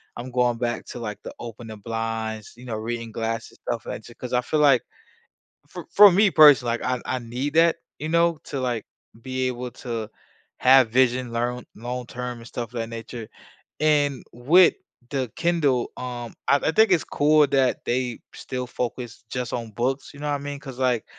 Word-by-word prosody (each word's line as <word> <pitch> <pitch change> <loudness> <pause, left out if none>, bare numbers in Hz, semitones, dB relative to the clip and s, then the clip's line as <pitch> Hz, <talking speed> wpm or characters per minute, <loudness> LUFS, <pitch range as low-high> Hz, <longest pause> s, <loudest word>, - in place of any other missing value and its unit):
I'm 125 +2 -7
going 125 -1 +2
back 120 0 -2
to, 120 - -7
like, 105 -3 -5
the - - -7
open 115 0 -8
the 110 -1 -8
blinds, 110 0 -4
you 125 +2 -13
know, 115 -3 -4
reading 115 +1 -4
glasses, 115 0 -4
stuff, - - -2
like, - - -6
si 120 - -12
'cause 125 +1 -7
I 125 - +3
feel, 150 +5 -1
like, 140 -4 +5 0.9
for - - -8
for 205 -1 +9
me 200 +2 +4
personally, 135 -7 +7
like, - - -10
I 125 -1 -1
I 130 - -1
need 125 +5 -4
that, 165 0 +5 0.2
you 155 +1 -4
know, 170 -1 +2
to, 140 - -4
like, 125 -3 -2 0.4
be 130 +1 -2
able 125 0 -4
to 115 -3 -5 0.5
have 130 -2 +6
vision 125 0 +2
learn 120 +1 -2
long 125 +2 -5
term 125 0 -5
and 115 - -11
stuff 120 0 -6
of 120 - -3
that 115 0 -3
nature, 115 0 -7 0.5
and 145 -3 +2
with 155 +10 +5 0.4
the 130 -4 -2
Kindle, 150 -8 +1
um, 120 -2 -6 0.2
I 140 - +6
I 160 - 0
think 220 +4 +5
it's 165 - +3
cool 150 0 +4
that 135 -2 +1
they 125 -1 -1 0.2
still 125 -1 -5
focus 120 -1 -5
just 125 -1 -3
on 115 -2 -4
books, 130 +5 -2
you - - -12
know 150 - -3
what 145 - +1
I - - -1
mean? 145 0 -5
'Cause, 135 -3 -10
like, 125 -4 +1
125 Hz, 200 wpm, -24 LUFS, 115-140 Hz, 0.9 s, for